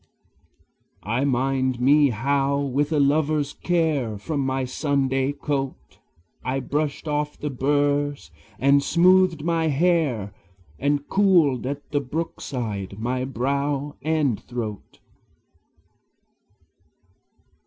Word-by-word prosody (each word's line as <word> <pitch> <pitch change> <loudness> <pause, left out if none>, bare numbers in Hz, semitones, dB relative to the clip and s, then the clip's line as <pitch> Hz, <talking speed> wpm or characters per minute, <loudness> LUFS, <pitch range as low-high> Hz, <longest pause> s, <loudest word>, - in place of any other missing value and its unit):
I 115 +6 0
mind 130 -1 0
me 140 +3 +5
how 135 +4 0
with 140 +2 -1
a 155 - +2
lover's 145 +1 +1
care 155 - 0
From 145 +8 -3
my 130 -1 -1
Sunday 135 0 0
coat 140 -2 -4 0.4
I 130 +1 -1
brushed 145 +3 -2
off 150 0 -2
the 150 - -4
burrs, 145 - 0 0.3
and 140 +1 +4
smoothed 180 0 +4
my 165 -1 +1
hair, 145 - +1 0.5
And 145 +1 0
cooled 170 - +3
at 140 +1 -6
the 145 -1 +1
brookside 125 - -4
my 125 +3 -2
brow 140 +3 -2
and 150 -6 0
throat. 110 -4 -6
140 Hz, 100 wpm, -24 LUFS, 130-150 Hz, 0.5 s, me